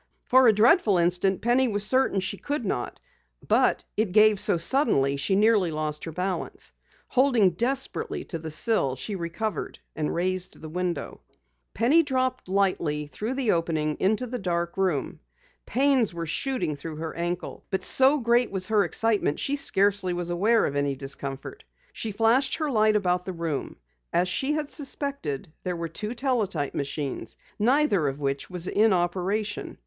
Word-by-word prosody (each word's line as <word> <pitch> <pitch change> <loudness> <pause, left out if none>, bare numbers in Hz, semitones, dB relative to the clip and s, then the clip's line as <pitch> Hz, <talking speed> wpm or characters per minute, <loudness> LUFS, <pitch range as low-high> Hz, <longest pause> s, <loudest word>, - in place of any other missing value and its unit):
For 260 0 +5
a - - +8
dreadful 215 - +4
instant, 180 +2 +1
Penny 250 +3 +3
was 205 -2 -1
certain 255 -5 +2
she 185 +2 -4
could 290 -1 -3
not. 125 -10 -3 0.5
But - - +2
it 210 -4 0
gave 215 -1 +5
so 175 - +3
suddenly 170 - +2
she 140 +8 0
nearly 210 -3 +4
lost 155 -1 -3
her 165 - -5
balance. 180 +3 -4 0.4
Holding 245 -8 +4
desperately 255 +9 -2
to 165 - -6
the 160 0 -6
sill, 155 - 0
she 200 - -5
recovered, 170 +2 -4 0.2
and 150 -1 -1
raised 185 +1 -2
the 155 - -8
window. 175 -1 -3 0.5
Penny 270 +9 +4
dropped 255 - -1
lightly 185 -6 0
through 215 - -4
the 260 -5 +1
opening 160 -3 0
into 215 +6 +1
the 250 0 -5
dark 170 -3 -2
room. 185 -8 -1 0.5
Pains 260 -6 +2
were 170 -1 -3
shooting 225 - -2
through 155 +3 -7
her 160 +1 -5
ankle, 175 +1 -4
but 190 - -2
so 270 +3 +4
great 235 0 +2
was 190 -2 -2
her 215 -1 +3
excitement 205 -2 0
she 280 - -1
scarcely 200 -7 +1
was 175 0 -3
aware 215 +6 +3
of 140 - -3
any 140 -1 0
discomfort. 140 - -6 0.3
She 220 - -4
flashed 225 +6 +2
her 310 -3 -2
light 215 -2 +3
about 180 -3 +1
the 185 - -4
room. 165 -4 -3 0.4
As 180 +1 +2
she 270 +10 0
had 300 -1 -3
suspected, 275 - -4
there 180 -1 -3
were 170 0 -3
two 210 +8 -5
teletype 220 - -1
machines, 140 -1 -4 0.2
neither 225 - +3
of 135 +1 -3
which 140 -1 -2
was 180 -2 -4
in 215 +2 +3
operation. 190 +4 -2
195 Hz, 165 wpm, -26 LUFS, 165-235 Hz, 0.5 s, a